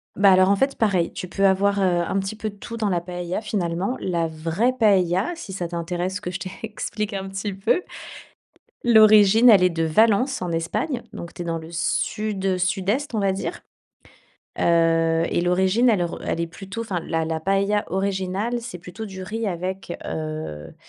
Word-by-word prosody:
Bah, 200 -1 +6
alors, 185 +1 +5
en 200 - +5
fait, 270 +6 0
pareil. 190 -7 +1
Tu 185 - -6
peux 195 +2 0
avoir, 200 +1 +3
heu, - - +2
un 175 +1 +1
petit 195 +2 -4
peu 215 0 -4
de 205 - -13
tout 230 +3 -8
dans 215 -3 0
la 175 -2 +1
paella, 175 +2 -4
finalement. 195 +1 -2
La 170 -3 -1
vraie 165 +10 0
paella, 195 - +3
si 205 - -8
ça 175 -2 -3
t'intéresse 175 +3 -3
que 180 -3 -5
je - - -5
t'explique 210 +2 -5
un 195 -1 -4
petit 195 +1 -4
peu. 195 - 0 1.0
L'origine, 215 0 +7
elle 195 -4 +7
est 180 - +5
de 165 -1 -2
Valence, 220 - +3
en 175 -2 -2
Espagne. 215 - -2
Donc, 170 -5 -8
tu - - -8
es 175 - -4
dans 165 -1 -2
le 160 +1 -9
sud, 195 +3 -1
sud-est, 200 +9 -1
on - - +1
va 195 -1 +2
dire. 190 - -4 1.0
Heu, 165 -1 +3
et - - +1
l'origine, 190 +7 +2
elle 200 -7 +3
re 170 - -5
elle - - -2
est 170 - 0
plutôt 195 +6 -7
enfin, 195 -6 -3
la 165 0 -2
la 160 0 -2
paella 195 +3 +1
originale, 195 +4 -1
c'est 235 -5 -7
plutôt 180 +6 -8
du 190 -1 -8
riz 220 +4 -3
avec, 185 0 -4
heu, 155 - -5
190 Hz, 190 wpm, -23 LUFS, 175-210 Hz, 1.0 s, L'origine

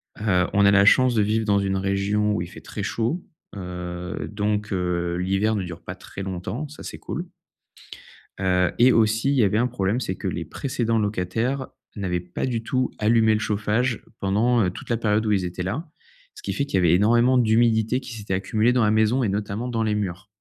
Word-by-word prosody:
Heu, 95 -4 +1
on 100 0 +4
a 100 - +6
la 100 0 +5
chance 130 +3 +5
de 105 - +3
vivre 110 +2 +1
dans 100 -1 +3
une 95 -1 0
région 100 +2 0
où 85 - -1
il 85 - -4
fait - - -12
très 100 - -6
chaud. 115 - -1 0.3
Heu 90 -1 -5
donc 105 0 -1
heu, 90 -1 -1
l'hiver 95 +4 +1
ne 100 - -1
dure 85 -1 -8
pas - - -7
très 95 - -9
longtemps. 95 - -4
Ça, 155 - -11
c'est - - -7
cool. - - -5 1.1
Heu 90 -1 +2
et 125 +2 +6
aussi, 110 +3 +2
il - - +2
y 120 - +4
avait 105 +2 +2
un 120 +2 +2
problème, 110 -1 -1
c'est 95 -7 -3
que - - -5
les - - -3
précédents 120 -5 -1
locataires 110 +7 -1 0.3
n'avaient 90 -4 -2
pas 90 +6 -4
du 120 -3 -2
tout 130 +1 -1
allumé 110 0 +4
le 110 - +1
chauffage 105 +3 -1 0.2
pendant, 110 +5 +2
heu, 90 - +1
toute 90 - -10
la 115 - +1
période 110 0 +1
où 105 - +1
ils 95 -3 +1
étaient 90 +1 -4
là. 140 - -4 0.5
Ce 420 - -13
qui - - -2
fait 140 - -1
qu'il 100 - -4
y - - +4
avait 85 -2 +4
énormément 120 +6 +4
d'humidité 115 +1 +3
qui 125 - -9
s'était 105 -4 -3
accumulée 110 +5 +1
dans 125 -3 +3
la 105 - +3
maison 110 +4 +2
et 105 - +1
notamment 105 +4 -3
dans 115 -2 -1
les 105 -1 0
murs. 95 -1 -4
105 Hz, 220 wpm, -24 LUFS, 95-115 Hz, 1.1 s, a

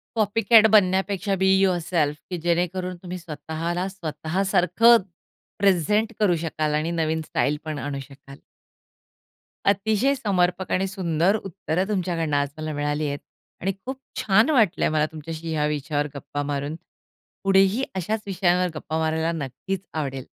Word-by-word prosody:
Copy 215 0 +1
cat 225 -2 +7
बनण्यापेक्षा 195 0 +3
be 190 0 +3
yourself 175 -5 +1
की 180 - -3
जेणेकरून 180 +2 -1
तुम्ही 180 0 -6
स्वतःला 165 +2 -4
स्वतःसारखं 190 +5 +3 0.6
प्रेझेंट 200 +4 +2
करू 190 -5 +3
शकाल 155 -2 -2
आणि 155 +2 -1
नवीन 160 -1 0
स्टाईल 150 +1 0
पण 155 -2 -4
आणू 140 +1 -4
शकाल. 140 +1 -12 1.3
अतिशय 215 +7 +2
समर्पक 185 -5 0
आणि 190 +1 +1
सुंदर 185 0 +1
उत्तर 185 -2 -3
तुमच्याकडनं 170 -7 0
आज 145 -1 0
मला 155 0 -4
मिळाली 145 +1 -1
आहेत. 145 0 -3 0.4
आणि 195 +2 0
खूप 265 0 -5 0.2
छान 220 +8 +4
वाटलं 225 - +3
आहे - - +1
मला 155 0 +3
तुमच्याशी 160 +1 -6
ह्या 150 -1 +1
विषयावर 150 0 -1
गप्पा 145 +1 -4
मारून. 145 +1 -3 0.7
पुढेही 195 +5 +3
अशाच 210 +4 -2
विषयांवर 180 -2 +1
गप्पा 155 +1 -4
मारायला 160 +1 0
नक्कीच 165 +5 -4
आवडेल. 135 -4 -3
175 Hz, 140 wpm, -24 LUFS, 155-195 Hz, 1.3 s, cat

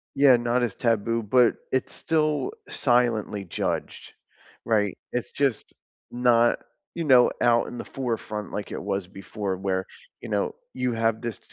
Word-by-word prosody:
Yeah, 135 -2 +7
not 120 +1 +1
as 115 -5 -1
taboo, 115 0 0
but 120 +2 +4 0.2
it's 130 - -1
still 155 - 0 0.2
silently 115 -5 +1
judged. 85 - -4 0.5
Right? 105 -4 +1 0.2
It's 125 - -2
just 135 -6 -1 0.4
not, 120 -1 +3 0.3
you 165 -2 -3
know, 125 -3 +6
out 120 -1 +4
in 120 - -7
the - - -6
forefront 110 -5 -4
like 105 - -5
it - - -4
was 100 -2 -2
before, 95 0 -4
where, 95 0 -1 0.4
you - - -7
know, 470 -2 0 0.2
you 125 - -1
have 115 -1 0
this, 120 -3 -4
115 Hz, 150 wpm, -25 LUFS, 105-125 Hz, 0.5 s, Yeah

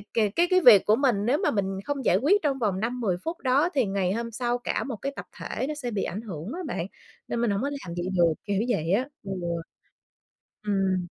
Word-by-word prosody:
c 200 - -19
cái 225 - +2
cái 370 0 +5
việc 210 -6 +9
của 215 +1 +5
mình 235 -7 +1
nếu 275 +5 +3
mà 385 - +1
mình 195 -2 -1
không 280 -3 -3
giải - - +4
quyết 320 - +3
trong 275 -3 0
vòng 205 -6 0
5-10 230 -4 -1
phút 330 +1 -3
đó 275 +6 +3
thì 265 -4 +3
ngày 195 -1 0
hôm 230 +2 -3
sau 240 +1 -1
cả 245 - -2
một 255 -5 -4
cái 275 - -2
tập - - -7
thể - - -3
nó 305 - -2
sẽ 255 -5 -4
bị 205 -3 -1
ảnh 205 - -4
hưởng 185 -2 -6
á 360 - -5
bạn, 170 - -3 0.4
nên 235 - -2
mình 235 - +2
hổng 200 +3 0
có 285 - -1
làm 230 -12 -6
vậy 175 +1 -2
được, 170 -2 +4
kiểu 205 -1 0
vậy 165 -8 0
á. 250 +7 +1
Ừ. 195 - -7 1.4
Ừm. 190 -3 +1
225 Hz, 240 wpm, -26 LUFS, 195-270 Hz, 1.4 s, việc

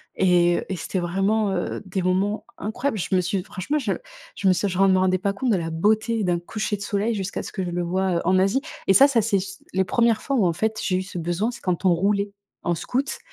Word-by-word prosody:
et, 175 -2 +4
heu, - - -4
et 190 - -2
c'était 185 - -4
vraiment, 195 +4 +1
heu, 180 -2 -2
des 190 0 -2
moments 190 +4 0
incroyables. 220 +3 -2
Je 185 - -3
me 185 - +4
suis 185 +1 -1
franchement, 195 +12 -3
je 240 -9 -1 0.4
je 195 - -1
me 185 - +6
suis 200 - 0
je 185 - -3
me 195 - +6
ren 190 -1 +5
rendais 185 -1 +2
pas 200 0 0
compte 245 +4 -1
de - - +4
la 165 -1 -3
beauté 215 +6 +1
d'un 175 -1 +1
coucher 210 +4 -3
de 200 - -13
soleil 205 +3 0
jusqu'à 200 -2 -3
ce - - -7
que 190 - -3
je 180 - -3
le 175 0 -2
vois, 185 +1 0
heu, - - -1
en 185 +1 +4
Asie. 195 +8 +2 0.3
Et 195 - +6
ça, 275 +7 +8
ça 240 -5 +2
c'est 205 -2 +1
c 195 +1 -8
les 190 0 +2
1res 230 0 +2
fois 275 - -1
où, 200 -7 +3
en 170 - +1
fait, 220 +5 -1
j'ai 185 -1 +1
eu 185 - -2
ce 185 -2 -7
besoin. 175 +7 -1
C'est 240 - -11
quand 180 0 -1
on 180 - +6
roulait 200 +3 +1 0.3
en 175 - +1
scooter 255 - -2
195 Hz, 270 wpm, -24 LUFS, 180-215 Hz, 0.4 s, ça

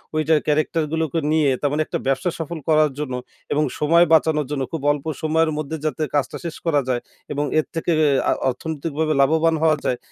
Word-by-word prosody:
ওইটা 155 +1 +3
ক্যারেক্টারগুলোকে 155 +1 0
নিয়ে, 155 -3 +3
তার 145 - +1
মানে 150 +2 0
একটা - - -3
ব্যবসা 135 +5 +1
সফল 165 +1 -4
করার 155 -1 +4
জন্য 145 -4 -3 0.4
এবং 150 +1 +2 0.2
সময় 170 +3 +5
বাঁচানোর 155 -1 +3
জন্য 140 -2 -1
খুব 165 - -4
অল্প 145 0 -4 0.2
সময়ের 160 0 +2
মধ্যে 155 +1 -3
যাতে 155 +1 -1
কাজটা 145 - 0
শেষ 165 - -4
করা 150 -4 +2
যায় 125 -2 0 0.3
এবং 145 0 -1
এর 155 - 0
থেকে 165 +1 -1 0.2
এ - - +4 0.2
আ - - +4 0.2
অর্থনৈতিকভাবে 155 +3 -2
লাভবান 160 +3 +3
হওয়া 155 -1 +4
যায়, 125 - +1
155 Hz, 190 wpm, -22 LUFS, 145-160 Hz, 0.4 s, সময়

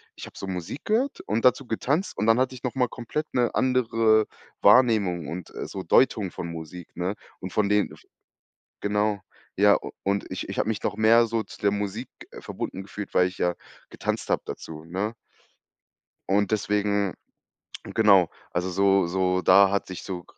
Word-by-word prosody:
ich - - -8
habe - - -13
so 95 - -6
Musik 90 - -5
gehört 245 +6 0
und 110 +4 0
dazu 125 0 +3
getanzt 145 - -1
und 110 - 0
dann 115 +2 +4
hatte 130 0 0
ich 125 - -13
noch 125 - -2
mal 125 -2 +1
komplett 150 +6 -5
'ne 120 -2 +2
andere 115 -4 +3 0.4
Wahrnehmung 105 - +4
und, 90 0 -7
äh, - - -5
so 95 - -6
Deutung 105 -7 +3
von 85 - -6
Musik, 85 +1 -9
ne? 90 +3 -2 0.3
Und 95 -1 -7
von 105 -2 +1
denen 105 0 +2
f - - -14 0.8
Genau. 105 0 +1 0.4
Ja, - - +6
u - - -8
und 100 +1 -1
ich - - -5
ich - - -5
habe - - 0
mich 110 - -2
noch 105 - -2
mehr 115 +2 +5
so 115 0 -1
zu - - -13
der 100 - +3
Musik 105 +4 -3 0.3
verbunden 95 - -5
gefühlt, 100 +1 -8
weil 90 - +4
ich 90 - -9
ja 90 0 +1 0.4
getanzt - - -3
hab - - +1
dazu, 80 0 -8
ne? 95 +6 -3 1.2
Und 100 +1 +2
deswegen 100 -2 0 0.7
genau, 100 -6 +4 0.2
also 90 +1 -1
so 95 0 +3
so 90 +1 0
da 95 +2 +6
hat 100 - 0
sich 95 -2 -7
so 90 -2 -6
100 Hz, 185 wpm, -25 LUFS, 95-115 Hz, 1.2 s, Ja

